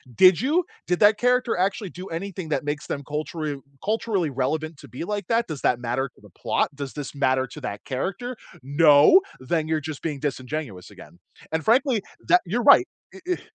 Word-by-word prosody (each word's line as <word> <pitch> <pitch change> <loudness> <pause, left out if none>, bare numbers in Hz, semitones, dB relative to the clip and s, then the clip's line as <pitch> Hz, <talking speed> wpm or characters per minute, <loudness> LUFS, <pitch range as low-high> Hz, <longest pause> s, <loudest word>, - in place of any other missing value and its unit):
Did 185 - +6
you? 315 +7 +2 0.2
Did 180 0 +1
that 210 0 +6
character 250 0 +2
actually 190 +1 -1
do 185 +3 -9
anything 175 0 -5
that 150 - -1
makes 145 0 -4
them 145 - -4
cultural 150 -1 -4 0.2
culturally 210 -5 0
relevant 150 +4 -2
to 140 - -13
be 125 - -6
like 205 0 -3
that? 230 0 +1
Does 155 -4 -6
that 120 - +2
matter 125 +3 -2
to - - -23
the - - -16
plot? - - -1
Does 140 -2 -6
this 145 -2 -6
matter 130 -1 +2
to - - -11
that 100 - -6
character? 195 - -3 0.3
No. 145 - +6 0.2
Then 155 +4 -1
you're 160 -1 0
just 155 -1 -6
being 150 -4 -3
disingenuous 130 - -4
again, 85 +4 -15 0.3
and 160 -1 -1
frankly, 245 -1 +3 0.3
that 180 - +6
you're 230 +7 -1
right. 320 +5 +7 0.2
It 385 - -13
it 360 0 -1
160 Hz, 195 wpm, -24 LUFS, 140-205 Hz, 0.3 s, right